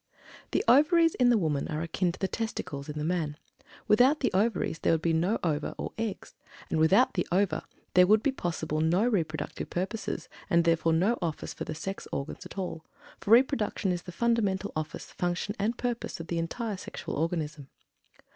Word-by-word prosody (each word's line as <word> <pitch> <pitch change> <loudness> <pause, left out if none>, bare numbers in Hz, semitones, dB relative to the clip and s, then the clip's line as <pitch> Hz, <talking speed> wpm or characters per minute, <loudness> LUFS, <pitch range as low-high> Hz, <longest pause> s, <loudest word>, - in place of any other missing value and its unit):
The - - +1
Ovaries 330 +4 +5
in 250 -1 +3
the 240 - +5
woman 155 -7 0
are 155 +1 -3
akin 175 +2 0
to - - -10
the 190 - -1
testicles 150 -11 -4
in 150 - -5
the 150 - -2
man. 160 -4 -1 0.5
Without 255 +8 +5
the 250 - +1
Ovaries 195 -4 +1
there - - +2
would 160 - +1
be 165 - +2
no 175 +7 +2
ova 150 -3 -1
or - - -5
eggs, 225 -3 -4 0.4
and 160 - +1
without 190 +11 +5
the 180 - -1
ova 190 +2 +1 0.3
there 180 0 +6
would 215 +2 +5
be 280 - +3
possible 160 - -2
no 175 +8 +3
reproductive 160 -9 -2
purposes, 190 +5 -3 0.2
and 170 -3 +4
therefore 165 -1 +2
no 195 +9 +2
office 165 -3 -3
for - - -6
the 155 - -5
sex 195 +5 -5
organs 140 +2 -5
at - - -13
all, 175 -4 -4 0.4
for - - -7
reproduction 230 -5 +3
is 175 -1 -2
the 180 - -9
fundamental 205 -2 0
office, 155 -1 -5
function, 175 +3 -2
and 220 +4 0
purpose 245 -6 -3
of 165 - -8
the 170 - -1
entire 205 +5 -3
sexual - - -7
organism. 155 -3 -2
180 Hz, 190 wpm, -29 LUFS, 160-220 Hz, 0.5 s, there